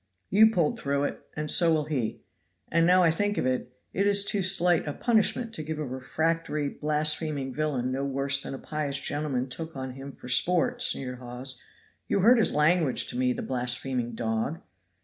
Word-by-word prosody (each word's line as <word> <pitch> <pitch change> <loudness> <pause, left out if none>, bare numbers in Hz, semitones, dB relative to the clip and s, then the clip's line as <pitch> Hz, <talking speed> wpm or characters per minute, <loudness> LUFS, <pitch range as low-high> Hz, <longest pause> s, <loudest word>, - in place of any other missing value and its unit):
"You 220 +3 +6
pulled 170 -8 0
through 140 0 -1
it - - -3 0.2
and 150 0 -1
so 170 -2 +5
will 155 -1 +2
he; 135 -7 -3 0.5
and 165 +1 +3
now 180 0 +5
I 165 - +4
think 205 +5 -1
of - - 0
it, 125 -1 -2 0.2
it 200 +1 +1
is 200 0 +4
too 200 0 +1
slight 180 -3 +2
a 145 - -2
punishment 230 - +1
to 160 - -4
give 155 0 -5
a 155 - -3
refractory, 150 +3 -2
blaspheming 150 -2 -1
villain 135 -4 -2
no 135 +1 -2
worse 140 0 +1
than 135 - -5
a - - -7
pious 145 -1 -3
gentleman 145 -4 -2
took 160 +5 -7
on 130 -1 -5
him 135 +2 -9
for 125 - -12
sport," 170 +7 +1
sneered 125 -2 +1
Hawes. 125 +1 -7 0.5
"You 200 - +1
heard 235 +5 +6
his 220 - +5
language 155 -1 +2
to - - -5
me, 125 0 +1
the - - -4
blaspheming 125 -1 -2
dog?" 115 +7 -2
150 Hz, 190 wpm, -27 LUFS, 130-165 Hz, 0.5 s, You